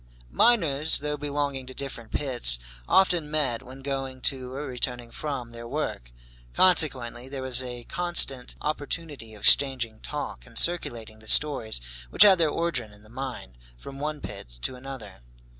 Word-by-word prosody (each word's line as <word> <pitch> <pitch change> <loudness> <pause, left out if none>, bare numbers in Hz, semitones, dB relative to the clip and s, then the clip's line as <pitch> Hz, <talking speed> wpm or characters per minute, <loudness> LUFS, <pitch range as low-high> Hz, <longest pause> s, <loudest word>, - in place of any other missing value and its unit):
Miners, 160 - +4
though 150 0 -2
belonging 145 -2 -3
to 130 - -9
different 120 -5 -7
pits, 120 - +3 0.3
often 175 -5 +3
met, 140 -6 0
when 135 +1 -12
going 135 -1 -4
to 130 -1 -3
or 140 +3 -5
returning 125 -2 -3
from 130 -5 -5
their 115 0 -9
work. 120 - -4 0.4
Consequently 130 -9 +4
there 135 -1 -6
was 130 -1 +1
a 125 -1 -7
constant 155 -6 +2
opportunity 145 -5 -4
of 105 - -14
exchanging 125 -5 +4
talk, 150 -1 -6
and 115 -1 -8
circulating 120 -11 0
the 110 - -15
stories 130 - +4 0.3
which 185 - +7
had 195 -4 +6
their 160 -2 +3
origin 145 -9 -2
in 105 0 -19
the 110 - -18
mine, 125 - -7 0.2
from 135 - -10
one 150 0 -4
pit 100 -11 -9
to - - -1
another. 125 - -9
135 Hz, 160 wpm, -26 LUFS, 120-150 Hz, 0.4 s, which